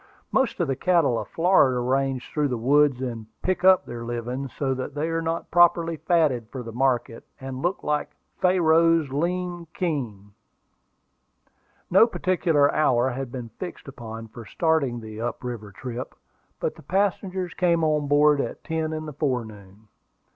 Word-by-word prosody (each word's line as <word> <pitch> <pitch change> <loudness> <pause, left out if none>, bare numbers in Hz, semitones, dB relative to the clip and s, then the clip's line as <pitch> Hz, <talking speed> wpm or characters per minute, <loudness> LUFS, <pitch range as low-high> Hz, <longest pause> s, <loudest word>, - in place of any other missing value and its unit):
Most 265 -6 +1
of 175 - +1
the 135 - 0
cattle 165 -8 +2
of - - -6
Florida 165 -7 +3
range 130 +1 -1
through 150 -1 +1
the 125 -3 -2
woods 135 +2 +3
and 115 -4 -5 0.2
pick 185 -1 0
up 190 0 +6
their 120 -1 -7
living, 120 +3 -4
so 135 +3 -2
that 130 +2 -5
they 155 +3 -1
are 165 0 -1
not 165 +1 -3
properly 170 -1 +4
fatted 145 -10 +1
for 130 -1 -6
the 115 - -7
market, 120 -1 0 0.2
and 130 0 -6
look 175 +3 -1
like 150 0 -1 0.3
"Pharaoh's 165 -3 +3
lean 175 +3 -2
kine." 120 - -3 1.6
No 195 +6 +7
particular 170 -9 +2
hour 130 -4 +3
had 130 0 -5
been 120 -3 -6
fixed 180 -5 -7
upon 115 -4 -8
for 115 +2 -10
starting 155 0 0
on 120 - -6
the 110 0 -8
up 120 +1 -4
river 115 -5 -6
trip, 125 +3 -7 0.4
but - - -1
the - - -15
passengers 190 +1 -1
came 170 -3 +2
on 150 -2 +1
board 145 0 +4
at - - -6
ten 160 -1 -2
in 155 0 -4
the 150 - -7
forenoon. 110 -7 -4
145 Hz, 165 wpm, -25 LUFS, 120-165 Hz, 1.6 s, No